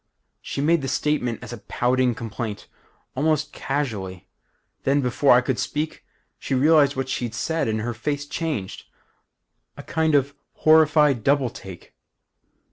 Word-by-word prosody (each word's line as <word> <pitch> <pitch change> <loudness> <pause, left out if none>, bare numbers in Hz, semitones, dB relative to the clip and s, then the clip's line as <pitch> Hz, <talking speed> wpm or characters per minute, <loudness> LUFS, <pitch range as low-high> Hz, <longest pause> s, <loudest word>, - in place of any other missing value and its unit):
"She - - -4
made 165 +2 +3
the 135 - -3
statement 130 -6 -1
as - - -8
a 120 - -7
pouting 125 +2 0
complaint, 110 -2 -6 0.5
almost 150 +2 0
casually. 100 -10 -4 0.5
Then, 140 +2 +2
before 125 +2 +3
I 125 - +5
could 130 -1 -2
speak, 155 +1 -3 0.4
she 135 - -2
realized 145 +1 +4
what 135 0 -2
she'd 120 -3 -3
said 160 +4 -1
and 110 -1 -1
her 120 +2 -3
face 145 +5 -3
changed. 145 - -4 0.9
A - - -8
kind 160 -2 +1
of 140 0 +2 0.2
horrified 150 -5 +4
double 140 -2 +2
take. 95 -8 -11
135 Hz, 140 wpm, -23 LUFS, 120-150 Hz, 0.9 s, I